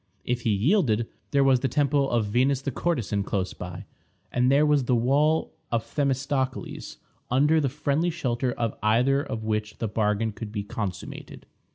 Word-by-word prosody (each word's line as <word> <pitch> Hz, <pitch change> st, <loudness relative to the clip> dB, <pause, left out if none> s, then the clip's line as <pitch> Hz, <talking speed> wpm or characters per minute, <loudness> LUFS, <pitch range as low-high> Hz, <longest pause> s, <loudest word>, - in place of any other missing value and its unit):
If 125 Hz, 0 st, -1 dB
he 115 Hz, -, 0 dB
yielded, 115 Hz, -, +2 dB, 0.2 s
there 140 Hz, -1 st, +3 dB
was 135 Hz, -2 st, +4 dB
the 135 Hz, -, 0 dB
temple 140 Hz, -1 st, +1 dB
of 115 Hz, -3 st, +1 dB
Venus 125 Hz, +6 st, +2 dB
the 140 Hz, -, -2 dB
Courtesan 120 Hz, -, -1 dB
close 95 Hz, -1 st, -2 dB
by, 90 Hz, -1 st, -8 dB, 0.5 s
and 125 Hz, +1 st, +2 dB
there 145 Hz, +2 st, +5 dB
was 145 Hz, -3 st, +3 dB
the 125 Hz, -, +2 dB
wall 145 Hz, +7 st, +2 dB, 0.2 s
of 115 Hz, -1 st, 0 dB
Themistocles, 135 Hz, -1 st, -2 dB, 0.3 s
under 150 Hz, +5 st, +3 dB
the 140 Hz, -, +1 dB
friendly 145 Hz, +4 st, 0 dB
shelter 130 Hz, -6 st, -1 dB
of 115 Hz, -2 st, -2 dB
either 125 Hz, +6 st, +3 dB
of 115 Hz, -6 st, -5 dB
which 105 Hz, -1 st, -2 dB
the 115 Hz, -, -2 dB
bargain 105 Hz, +1 st, 0 dB
could 105 Hz, 0 st, -7 dB
be 105 Hz, -2 st, -3 dB
consummated. 100 Hz, -4 st, -6 dB
125 Hz, 170 wpm, -26 LUFS, 110-140 Hz, 0.5 s, there